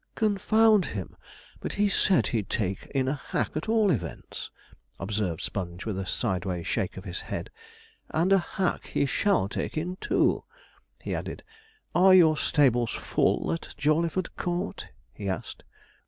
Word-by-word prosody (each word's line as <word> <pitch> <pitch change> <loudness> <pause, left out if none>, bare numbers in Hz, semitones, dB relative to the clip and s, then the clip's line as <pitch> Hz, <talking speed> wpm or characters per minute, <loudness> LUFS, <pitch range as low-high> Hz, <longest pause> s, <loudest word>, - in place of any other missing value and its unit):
'Confound 215 0 +4
him, 100 - -5 0.4
but - - -4
he 205 0 +2
said 195 -1 +3
he'd 110 -5 -1
take 95 -3 -2
in 135 -2 0
a 135 - +1
hack 145 - -2
at 155 +7 -3
all 220 -3 +4
events,' 90 - -4 0.5
observed 95 -4 -2
Sponge, 90 -1 -4
with 110 -3 -2
a 95 - -4
sideway 95 -6 -1
shake 95 +3 -2
of 95 - -7
the 95 - -6
head; 85 - -5 0.6
'and 175 +5 +2
a 195 - +6
hack 180 +1 -2
he - - +1
shall 190 - +2
take 105 - -4
in, 180 +4 -2
too' - - +2 0.6
he - - -3
added. - - -5 0.5
'Are 185 +1 +7
your 160 -4 +7
stables 125 -7 +3
full - - +1
at 165 - -6
Jawleyford 165 +4 +1
Court?' 180 +3 -3 0.3
he 100 -2 -4
asked. 95 - -5
150 Hz, 155 wpm, -27 LUFS, -, 0.6 s, Are